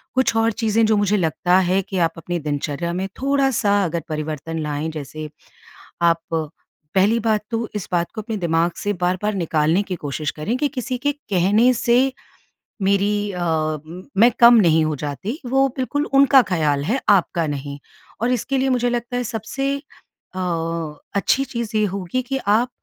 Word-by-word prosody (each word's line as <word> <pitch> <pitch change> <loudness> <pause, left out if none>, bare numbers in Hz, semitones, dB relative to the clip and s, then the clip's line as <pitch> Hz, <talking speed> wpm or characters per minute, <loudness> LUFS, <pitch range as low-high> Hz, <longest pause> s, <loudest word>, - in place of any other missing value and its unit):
कुछ 260 -3 +2
और 225 0 +3
चीज़ें 225 0 +1
जो 215 -1 +3
मुझे 205 0 +2
लगता 175 +1 +2
है 185 +1 +2
कि 190 0 -6
आप 165 -2 +2
अपनी 175 +2 -3
दिनचर्या 150 +2 -3
में 185 +2 -2
थोड़ा-सा 265 -7 +2
अगर 170 0 -2
परिवर्तन 155 +1 -4
लाएँ, 150 +1 -2
जैसे 155 0 -7 0.7
आप, 170 -1 +3 0.7
पहली 205 +5 +4
बात 215 -2 +1
तो 230 0 -1
इस 205 - -4
बात 175 -1 0
को 220 - -5
अपने 220 +1 -4
दिमाग 170 -1 +1
से 205 - -2
बार-बार 185 +4 0
निकालने 165 -1 +1
की 190 -2 -4
कोशिश 150 -1 -3
करें 160 +10 -3
कि 290 - +1
किसी 255 -3 -4
के 290 +4 0
कहने 210 - +2
से 240 0 +2 0.9
मेरी 205 +1 +1
अ, 180 - -5 0.8
मैं 230 +5 +6
कम 240 0 +9
नहीं 160 -4 +4
हो 155 -1 -1
जाती 150 - -4
वो 270 +2 +3
बिल्कुल 285 +3 -1
उनका 275 -1 +7
ख़्याल 150 -5 +1
है, 240 - 0
आपका 175 -4 +3
नहीं। 140 -1 -5 0.4
और 235 +2 +1
इसके 255 +3 -1
लिए 265 +1 +1
मुझे 245 -2 +1
लगता 240 0 -3
है 245 - 0
सबसे 255 +5 -2
अ, 280 -8 -15 0.8
अच्छी 260 +7 +2
चीज़ 235 -4 -4
ये 215 - +3
होगी 195 +5 -3
कि 270 +2 -3
आप 220 +5 +3
200 Hz, 170 wpm, -21 LUFS, 165-240 Hz, 0.9 s, कम